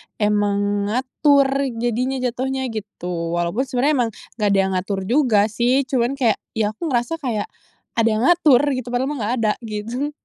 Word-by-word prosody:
emang 205 -1 +1
ngatur 275 +3 +2
jadinya, 240 +3 -1
jatuhnya 260 +2 -2
gitu. 180 -6 -4
Walaupun 175 +10 -1
sebenarnya 260 +4 +1
emang 225 - -7 0.3
nggak 210 - +2
ada - - +4
yang 190 - -1
ngatur 190 +1 -2
juga 220 -2 +2
sih. 245 +4 +2
Cuman 255 0 0
kayak 240 -6 +1 0.2
ya 215 -2 +1
aku 320 +10 -5
ngerasa 250 +4 -1
kayak 235 -8 -2 0.5
ada 230 - +3
yang 215 +2 0
ngatur 320 -8 +5 0.2
gitu 255 -1 -5
padahal 250 +2 0
mah 295 - -4
nggak 225 +3 -1
ada 215 -1 +3
gitu. 230 +7 -3
235 Hz, 170 wpm, -21 LUFS, 210-265 Hz, 0.5 s, ngatur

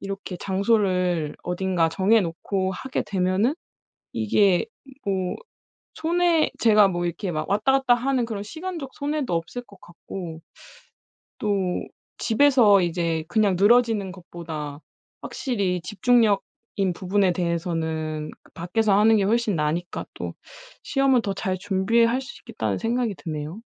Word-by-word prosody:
이렇게 195 -2 -6
장소를 185 -5 0
어딘가 180 -2 0
정해 200 +7 +3
놓고 190 +2 -2
하게 260 +7 -3
되면은 195 +7 +1 0.6
이게 175 - +2 0.4
뭐 185 -2 -1 0.6
손해 340 0 +2
제가 210 -3 +5
뭐 175 -1 -2
이렇게 175 +2 -3
막 155 0 -3
왔다 210 +6 +2
갔다 265 -2 +4
하는 250 0 0
그런 215 -3 -4
시간적 320 - -6
손해도 290 -6 -2
없을 170 +9 -3
것 200 -5 -19
같고 170 -1 -8 1.0
또 195 -4 0 0.4
집에서 230 -5 +5
이제 165 -2 -1
그냥 205 -4 +2
늘어지는 215 -2 +3
것보다 160 -5 -7 0.4
확실히 200 - -2
집중력인 210 -1 +1
부분에 190 0 +1
대해서는 160 -3 -2
그 - - -24
밖에서 195 +4 +1
하는 220 +1 +5
게 205 - +2
훨씬 220 -2 +1
나으니까 155 +4 -2
또 - - -6 0.5
'시험은 270 -3 +2
더 200 - -2
잘 190 -1 -2
준비할 225 +6 +2
수 265 - -10
있겠다.'는 - - -3
생각이 235 -2 -1
드네요. 155 +5 -6
195 Hz, 280 characters per minute, -24 LUFS, 175-230 Hz, 1.0 s, 제가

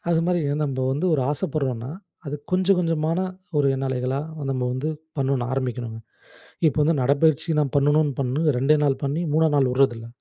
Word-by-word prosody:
அதுமாரி, 170 +1 +2 0.2
நம்ப 135 -3 -2
வந்து 150 +7 -1
ஒரு 140 - +1
ஆசப்படுறோன்னா, 135 -4 -2 0.4
அது 145 - -3 0.2
கொஞ்சம், 185 +1 +3
கொஞ்சமான 165 -1 0 0.4
ஒரு 140 - +3
எண்ணலைகளா, 130 0 -2 0.3
நம்ம 130 -2 -1
வந்து 130 +4 -2 0.3
பண்ணனும், 135 -2 0
ஆரம்பிக்கணுங்க. 125 -4 -3 0.7
இப்ப 155 - +1
வந்து, 160 +1 +2
நடைப்பயிற்சி 150 +4 +2
நான் 145 -2 -1
பண்ணணும்னு 145 +1 +3
பண்ணி, 135 +4 -1 0.2
2 145 +4 +4
நாள் 135 -2 +1
பண்ணி, 145 +5 -1
3 160 0 +4
நாள் 135 -2 +3
வுடுறதில்ல. 120 -4 +1
140 Hz, 155 wpm, -23 LUFS, 130-155 Hz, 0.7 s, 2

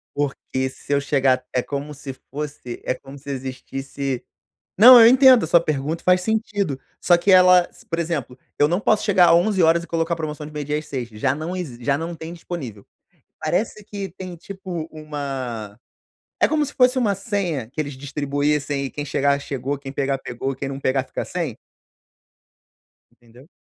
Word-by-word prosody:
Porque 135 -2 -2
se 140 +2 -6
eu 140 - +3
chegar 135 -2 +2
é 125 - +2
como 145 +2 -5
se 140 -1 -8 0.2
fosse, 145 -4 -6
é - - +1
como 135 +2 -12
se 140 +1 -11
existisse 135 0 -4 0.5
não, 240 +4 +10
eu 225 - +9
entendo 260 -2 +7
a - - -1
sua 170 +1 +6
pergunta, 155 +2 -2
faz 180 0 +4
sentido, 205 - -1 0.2
só 175 - +5
que 180 +3 +2
ela 180 -1 +7
s - - -20
por 165 0 -3
exemplo, 155 -7 -3 0.2
eu 145 - +4
não 175 +4 0
posso 215 0 +2
chegar 190 -4 +5
11:00 170 -3 +3
e - - -11
colocar 165 0 -1
promoção 150 -2 -5
de - - -11
meio-dia 150 0 -2
às 150 - -12
18:00, 125 -4 -4
já 130 +5 -1
não 165 +4 -4
exi 130 -10 -6
já 140 +3 +2
não 165 +3 -4
tem 160 +2 -8
disponível. 140 - -7 0.6
Parece 215 0 -2
que 200 -2 -6
tem 180 0 -8
tipo 175 -2 -7
uma 135 -8 -5 0.6
é - - +5
como 300 -1 +1
se 285 - -8
fosse 250 0 +4
uma 215 -5 +2
senha 185 - -3
que 155 - -8
eles 145 -1 -5
distribuíssem, 145 0 -1
e - - -4
quem 145 - -5
chegar 140 0 +1
chegou, 135 +1 -3
quem 135 -1 -8
pegar 135 0 -1
pegou 135 +1 -4
e - - -11
quem 135 +1 -4
não 135 0 -5
pegar 130 -1 +1
fica - - -5
sem? 165 -10 -4 1.6
Entendeu? 120 +6 -19
150 Hz, 185 wpm, -22 LUFS, 135-180 Hz, 1.6 s, não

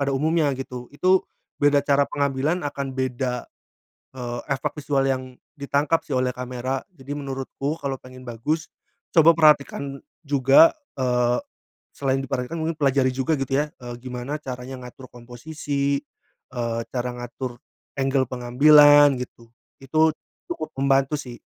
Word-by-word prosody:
pada 140 0 0
umumnya, 155 +1 +2
gitu. 125 -2 -7
Itu 185 +5 +3 0.3
beda 145 0 +4
cara 140 0 +3
pengambilan 145 +4 -1
akan 140 -1 -4
beda, 125 -1 -2 0.7
eee, 120 -1 -4
efek 135 - -3
visual 140 -1 +1
yang 130 -1 -2 0.2
ditangkap 145 +3 +1
sih 145 - -4
oleh 130 0 +1
kamera, 125 +1 -3
jadi 145 0 -7
menurutku 140 +2 -4
kalau 135 -1 -2
pengen 130 0 -13
bagus 150 +8 -2 0.5
coba 165 +1 +7
perhatikan 140 -2 +3 0.3
juga 140 - +6 0.2
eee, 125 -2 +2 0.6
selain 135 -1 0
diperhatikan 135 +4 -3
mungkin 165 +1 -1
pelajari 135 -2 +2
juga 130 +4 0
gitu 135 0 -2
ya, 150 +1 0
eee, 120 0 -7
gimana 130 +3 -5
caranya 130 -1 -7
ngatur 130 +1 -12
komposisi, 140 +3 -3 0.5
eee, 115 -2 -2
cara 125 0 -1
ngatur 120 0 -6 0.4
angle 135 -1 +1
pengambilan 145 +4 +6
gitu, 115 -2 -10 0.3
itu 155 +4 +3 0.4
cukup 340 -1 -4
membantu 135 +1 +2
sih. 125 -4 -9
135 Hz, 135 wpm, -24 LUFS, 125-145 Hz, 0.7 s, coba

